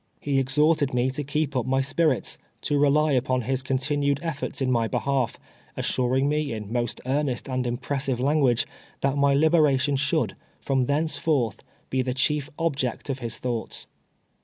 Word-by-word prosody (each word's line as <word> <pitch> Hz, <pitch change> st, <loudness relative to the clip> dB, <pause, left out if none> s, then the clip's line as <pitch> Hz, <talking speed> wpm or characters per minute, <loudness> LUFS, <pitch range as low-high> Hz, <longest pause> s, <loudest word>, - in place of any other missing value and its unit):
He 140 Hz, -2 st, 0 dB
exhorted 145 Hz, +1 st, +2 dB
me 125 Hz, +2 st, +2 dB
to 145 Hz, +3 st, -3 dB
keep 145 Hz, 0 st, -1 dB
up 125 Hz, -1 st, 0 dB
my 135 Hz, +1 st, +2 dB
spirits 145 Hz, +4 st, +1 dB
— -, -, -42 dB
to 145 Hz, -2 st, +1 dB
rely 150 Hz, +2 st, +4 dB
upon 130 Hz, -1 st, +1 dB
his 130 Hz, +2 st, 0 dB
continued 140 Hz, +2 st, 0 dB
eftbrts 150 Hz, -3 st, -3 dB
in 130 Hz, -2 st, +1 dB
ni}' 115 Hz, -2 st, +2 dB
behalf, 130 Hz, -1 st, -1 dB, 0.4 s
assuring 130 Hz, +2 st, +1 dB
me, 150 Hz, -3 st, 0 dB
in 110 Hz, 0 st, -6 dB
most 120 Hz, -2 st, -2 dB
earnest 135 Hz, -1 st, -1 dB
and 130 Hz, -1 st, -1 dB
impres 130 Hz, +3 st, -2 dB
sive 130 Hz, -3 st, -1 dB
language, 135 Hz, -3 st, +2 dB, 0.4 s
that 140 Hz, 0 st, +1 dB
my 140 Hz, -1 st, +3 dB
liberation 145 Hz, -3 st, +3 dB
should, 140 Hz, +1 st, 0 dB, 0.2 s
from 130 Hz, -2 st, 0 dB
thence 155 Hz, +3 st, +1 dB
forth, 135 Hz, -11 st, 0 dB, 0.3 s
be 130 Hz, -, +2 dB
the 125 Hz, 0 st, -2 dB
chief 145 Hz, +2 st, +1 dB
object 140 Hz, -5 st, -1 dB
of 135 Hz, -, -4 dB
his 115 Hz, -2 st, -2 dB
thoughts. 120 Hz, -3 st, -2 dB
135 Hz, 170 wpm, -25 LUFS, 130-145 Hz, 0.4 s, rely